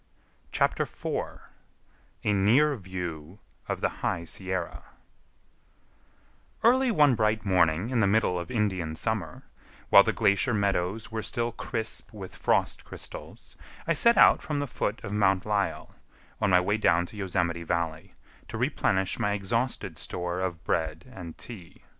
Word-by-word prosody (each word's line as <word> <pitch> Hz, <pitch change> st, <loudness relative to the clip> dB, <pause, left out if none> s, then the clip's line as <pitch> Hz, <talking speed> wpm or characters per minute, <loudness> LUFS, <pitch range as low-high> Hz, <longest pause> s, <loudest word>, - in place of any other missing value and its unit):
CHAPTER -, -, +1 dB
IV -, -, -4 dB, 0.8 s
A 105 Hz, -, +2 dB
NEAR 120 Hz, +10 st, +4 dB
VIEW 90 Hz, -, -6 dB, 0.3 s
OF -, -, -2 dB
THE -, -, +2 dB
HIGH 85 Hz, -, -1 dB
SIERRA 95 Hz, 0 st, -3 dB, 1.8 s
Early 255 Hz, +2 st, +4 dB
one 150 Hz, -, +5 dB
bright 110 Hz, -2 st, +1 dB
morning 90 Hz, +2 st, +2 dB
in 125 Hz, -, +1 dB
the 105 Hz, -, +4 dB
middle 95 Hz, -3 st, +2 dB
of 85 Hz, -, -6 dB
Indian 95 Hz, -8 st, -1 dB
summer, 100 Hz, -6 st, -3 dB, 0.5 s
while -, -, +10 dB
the -, -, +1 dB
glacier 100 Hz, +4 st, +2 dB
meadows 100 Hz, +1 st, -1 dB
were 110 Hz, 0 st, -3 dB
still 120 Hz, +2 st, -1 dB
crisp 110 Hz, 0 st, -4 dB
with 95 Hz, -4 st, -9 dB
frost -, -, 0 dB
crystals, -, -, -9 dB, 0.3 s
I 165 Hz, -, +2 dB
set 235 Hz, +9 st, +5 dB
out -, -, +7 dB
from 150 Hz, -, -3 dB
the 145 Hz, -, -1 dB
foot 115 Hz, -4 st, -3 dB
of 100 Hz, -, -5 dB
Mount 95 Hz, -3 st, +2 dB
Lyell, 105 Hz, -2 st, -1 dB, 0.5 s
on 105 Hz, -, +2 dB
my 90 Hz, -1 st, +6 dB
way 100 Hz, +4 st, 0 dB
down 85 Hz, -5 st, +3 dB
to 100 Hz, -, -13 dB
Yosemite 90 Hz, -4 st, -1 dB
Valley, 85 Hz, -2 st, -3 dB, 0.3 s
to -, -, -6 dB
replenish 95 Hz, 0 st, 0 dB
my 105 Hz, -, +1 dB
exhausted 115 Hz, +5 st, -2 dB
store 90 Hz, 0 st, -2 dB
of 90 Hz, -3 st, -3 dB
bread 80 Hz, 0 st, -1 dB
and 85 Hz, -3 st, -8 dB
tea. 100 Hz, -9 st, -10 dB
100 Hz, 145 wpm, -27 LUFS, 90-110 Hz, 1.8 s, while